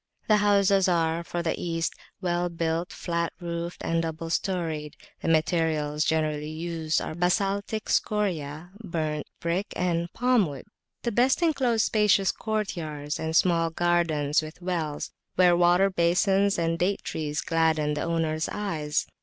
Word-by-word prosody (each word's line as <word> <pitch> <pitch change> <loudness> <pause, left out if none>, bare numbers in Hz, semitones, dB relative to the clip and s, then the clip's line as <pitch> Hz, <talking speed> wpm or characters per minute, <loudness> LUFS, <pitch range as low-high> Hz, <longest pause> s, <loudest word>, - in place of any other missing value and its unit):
The 215 - +5
houses 200 -2 +4
are, 165 -1 +1
for 170 0 -3
the 165 - 0
East, 165 -1 -1 0.3
well 175 -1 0
built, 165 0 -2
flat 170 -1 -2
roofed 170 0 -5
and 165 0 +1
double 165 0 -4
storied; 165 -6 -2 0.2
the - - -4
materials 155 -2 +1
generally 155 -1 0
used 160 0 -1
are - - -4
a - - -7
basaltic 200 +4 0
scoria, 175 -6 -1
burnt 155 -5 -3
brick, 170 +4 -1
and 170 -1 -1
palm 245 -5 +3
wood. 140 -3 -8 0.4
The 235 - 0
best 255 +9 +3
enclose 255 -9 +2
spacious 210 -3 +3
courtyards 160 -9 -3
and 160 0 -2
small 165 -2 +3
gardens 165 -4 +1
with 155 +2 -9
wells, 170 -5 -3 0.2
where 180 -1 +5
water 175 +3 +4
basins 190 +3 +2
and 165 0 0
date 190 +3 0
trees 150 -1 -3
gladden 160 -2 +1
the 150 - -2
owners' 160 -2 -1
eyes. 155 -8 -1
170 Hz, 145 wpm, -26 LUFS, 160-190 Hz, 0.4 s, The